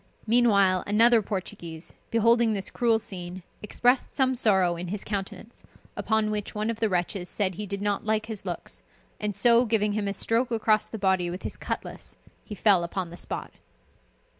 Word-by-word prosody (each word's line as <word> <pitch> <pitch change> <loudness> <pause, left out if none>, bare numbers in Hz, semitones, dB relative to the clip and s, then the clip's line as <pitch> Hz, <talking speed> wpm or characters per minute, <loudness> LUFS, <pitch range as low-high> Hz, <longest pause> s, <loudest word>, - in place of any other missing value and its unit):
Meanwhile, 200 -6 +4
another 225 +3 +5
Portuguese, 185 -5 -6 0.2
beholding 230 0 +3
this 195 -2 -3
cruel 230 -2 +2
scene, 185 -4 -7 0.2
expressed 245 +4 +1
some 260 -2 +2
sorrow 190 -8 +3
in 175 +1 -6
his 195 +3 -4
countenance, 200 +3 -6 0.3
upon 220 -1 0
which 210 0 -4
one 215 +2 -1
of 225 - -7
the 220 - +1
wretches 180 0 -1
said 190 -3 0
he 210 +4 -6
did 200 +1 -4
not 205 -1 -1
like 215 0 0
his 220 -3 -4
looks, - - -6 0.4
and 210 -1 -3
so 235 +2 +5
giving 210 -3 +1
him 205 -1 -2
a 200 - -2
stroke 230 +5 0
across 215 -2 +1
the 220 - -6
body 190 -3 +1
with 180 +2 -7
his - - -5
cutlass, - - -6 0.3
he 210 - -8
fell 195 -3 +3
upon 170 0 -4
the - - -9
spot. - - -5
210 Hz, 180 wpm, -26 LUFS, 190-225 Hz, 0.4 s, another